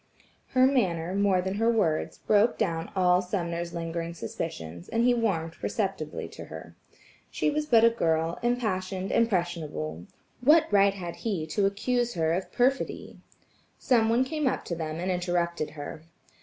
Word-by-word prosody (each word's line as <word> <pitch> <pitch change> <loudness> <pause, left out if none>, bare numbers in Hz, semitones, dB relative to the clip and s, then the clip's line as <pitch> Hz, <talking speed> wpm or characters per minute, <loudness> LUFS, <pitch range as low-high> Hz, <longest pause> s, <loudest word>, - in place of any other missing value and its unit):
Her 255 0 +6
manner 185 -10 +1
more 195 -2 +2
than 190 +1 -2
her 225 +2 +2
words, 170 -9 0
broke 215 +2 +3
down 165 +3 -1
all 180 -1 +4
Sumner's 175 -2 -3
lingering 170 0 -4
suspicions, 85 - -6
and 230 - +1
he 245 0 +5
warmed 185 -9 0
perceptibly 190 -7 -3
toward - - -10
her. - - -9 0.5
She - - 0
was 300 0 -1
but 230 -5 +5
a 230 - +7
girl, 165 -5 0
impassioned, 195 -6 -1
impressionable. 165 - -1 0.4
What 305 +5 +6
right 200 -1 +4
had 175 -3 -6
he 195 -9 -2
to 195 +5 +2
accuse 240 +4 -1
her 160 -1 +1
of 185 +2 -3
perfidy. 260 +2 0 0.6
Some 230 -3 +2
one 235 +3 +3
came 300 +1 -1
up - - -1
to 170 - -3
them 160 -1 -4
and 185 +2 -1
interrupted 175 -3 -1
her. 145 +2 -7
185 Hz, 155 wpm, -27 LUFS, 165-230 Hz, 0.6 s, a